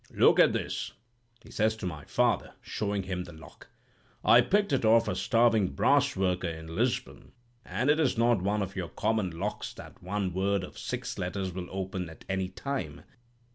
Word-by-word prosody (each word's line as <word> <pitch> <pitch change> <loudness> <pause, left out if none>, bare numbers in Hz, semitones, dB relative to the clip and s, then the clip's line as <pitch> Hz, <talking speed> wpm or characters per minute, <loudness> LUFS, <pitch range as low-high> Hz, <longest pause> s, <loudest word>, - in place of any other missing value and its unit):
"'Look - - +5
at - - +7
this,' - - -3 0.5
he - - -14
says 110 0 +1
to 110 - -7
my 80 -5 -5
father, - - +1
showing 100 -2 -2
him 90 -1 -3
the 85 - -11
lock. 80 0 -14 0.6
'I 120 - +8
picked 200 +6 +1
it 135 - +2
up 110 - +4
off 115 0 +5
a - - -1
starving 115 -4 +3
brass - - +3
worker 90 -1 0
in 80 0 -6
Lisbon, 120 +5 -2 0.3
and 110 +9 -2
it 150 +2 +4
is 135 -7 +2
not 115 -3 +3
one 100 +2 0
of 95 0 -7
your 90 -3 -3
common 110 -3 0
locks 85 0 -4
that - - -12
one 95 0 -2
word 95 +1 +1
of - - -9
six - - -4
letters 95 0 -3
will 90 0 -5
open 95 -2 -4
at 80 - -14
any 95 -1 -1
time. 95 - -5
95 Hz, 190 wpm, -29 LUFS, 90-115 Hz, 0.6 s, I